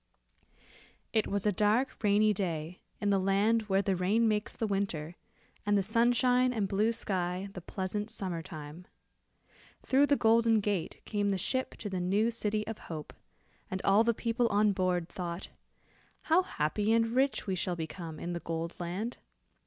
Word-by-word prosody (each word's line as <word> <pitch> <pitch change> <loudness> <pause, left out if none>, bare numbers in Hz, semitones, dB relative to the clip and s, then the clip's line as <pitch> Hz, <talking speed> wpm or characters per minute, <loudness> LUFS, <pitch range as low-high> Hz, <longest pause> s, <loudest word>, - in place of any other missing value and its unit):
It 220 -2 +2
was 200 0 -1
a 210 - +4
dark 215 +7 +1
rainy 210 +1 +4
day 175 -3 -3 0.2
in 205 -1 +1
the 195 - +3
land 205 +3 +2
where 195 +1 +3
the 195 -1 +1
rain 205 +6 +2
makes 210 -1 0
the 230 - -1
winter, 195 -6 -2 0.5
and 205 0 +2
the 195 - +2
sunshine 245 +4 +3
and 215 -5 -1
blue 205 +4 +2
sky 185 -3 -2
the 180 - -7
pleasant 195 +4 -3
summer 180 -6 -4
time. 160 0 -9 1.0
Through 275 +2 +4
the 285 - +4
Golden 225 -2 +4
Gate, 200 -5 -2
came 205 -1 0
the 195 - +1
ship 260 +8 -2
to 215 - -6
the 190 -2 -3
new 200 +6 +2
city 215 -2 -1
of 225 -1 -6
hope, 155 -3 -6 0.6
and 190 - -3
all 200 +3 +5
the 230 0 +1
people 235 +1 0
on 210 0 +3
board 180 -3 0
thought, 175 -1 -5 0.7
"how 330 +3 +4
happy 205 - -1
and 230 0 +3
rich 265 +2 +1
we 195 - -1
shall 180 0 -1
become 160 -1 -6
in 175 - -4
the 170 - -3
Gold 165 0 -4
Land. 185 +7 -3
200 Hz, 170 wpm, -31 LUFS, 180-225 Hz, 1.0 s, all